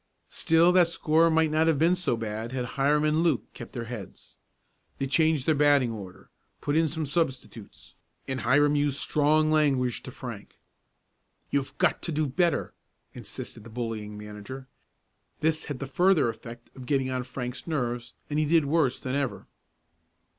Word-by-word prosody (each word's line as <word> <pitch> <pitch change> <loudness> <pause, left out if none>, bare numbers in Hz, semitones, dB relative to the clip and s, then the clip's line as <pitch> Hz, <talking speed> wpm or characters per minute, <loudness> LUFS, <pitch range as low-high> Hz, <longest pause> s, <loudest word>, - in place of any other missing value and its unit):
Still 165 +2 +3
that 180 -2 +5
score 165 0 +3
might 160 -1 +2
not 160 +1 +2
have 160 -3 +3
been 165 +5 +4
so 180 -10 -1
bad 110 +2 -4
had 125 -2 -2
Hiram 145 +2 +2
and 155 +1 +2
Luke 150 -11 +2
kept 120 - -10
their 120 -3 -4
heads. 115 -5 -9 0.6
They 135 - -1
changed 155 0 +2
their 160 - +4
batting 145 -4 +4
order, 95 -5 -10 0.3
put 145 - -1
in 160 0 +4
some 155 +1 -3
substitutes, 135 - -4 0.3
and 130 -2 -2
Hiram 145 +6 +3
used 145 -1 +1
strong 155 +2 +2
language 135 -6 +2
to - - -9
Frank. - - -9 0.9
"You've 140 -1 -1
got - - +2
to 170 - -4
do 155 0 0
better!" 170 +5 0 0.4
insisted - - -7
the 115 - -11
bullying 110 -3 -5
manager. 105 +6 -9 0.7
This 155 0 0
had 145 -4 -4
the 135 - -5
further 175 0 +3
effect 115 +1 -9
of 130 -2 -10
getting 135 -2 +1
on 130 -1 -1
Frank's 125 +1 -6
nerves, 120 -6 -3
and 150 0 -1
he 155 - +2
did 160 0 +3
worse 140 -3 +1
than 130 - -4
ever. 135 -7 -2
140 Hz, 170 wpm, -27 LUFS, 120-155 Hz, 0.9 s, that